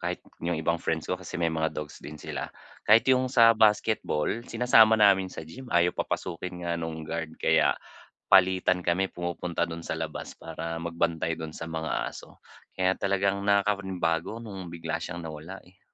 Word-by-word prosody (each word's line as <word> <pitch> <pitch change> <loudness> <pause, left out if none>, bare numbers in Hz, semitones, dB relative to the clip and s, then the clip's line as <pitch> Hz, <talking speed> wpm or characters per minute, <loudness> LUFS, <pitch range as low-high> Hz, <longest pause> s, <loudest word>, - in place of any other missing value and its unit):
kahit - - -2 0.2
yung 85 -1 -1
ibang 85 +1 0
friends 80 -1 -1
ko - - -3
kasi 90 - -7
may 85 -2 0
mga 80 0 0
dogs 75 -1 -6
din 75 - -9
sila. 75 - -5 0.4
Kahit 110 +2 +7
yung 130 0 +2
sa 115 -3 +6
basketball 110 -3 +2
sinasama 115 -2 +5
namin 100 -3 +5
sa 80 - -8
gym, 125 +11 -11
ayaw 85 0 +3
papasukin 90 0 -4
nga 85 - -1
nung 80 -1 -5
guard, 80 0 -5
kaya - - +3 0.5
palitan 95 -1 +4
kami 90 +3 +1
pumupunta 85 -1 -3
dun 85 0 -4
sa - - -2
labas 80 -1 -5
para 85 0 -6
magbantay 85 0 -1
dun 80 -1 -6
sa - - -6
mga 80 -1 -3
aso. - - -12 0.4
Kaya 95 0 +2
talagang 100 0 +1
nakakapanibago 100 -1 0
nung 95 -4 -7
bigla 85 -1 -4
siyang 85 0 -6
nawala, 80 +4 -8
eh. 90 +2 -23
85 Hz, 170 wpm, -27 LUFS, 80-100 Hz, 0.5 s, Kahit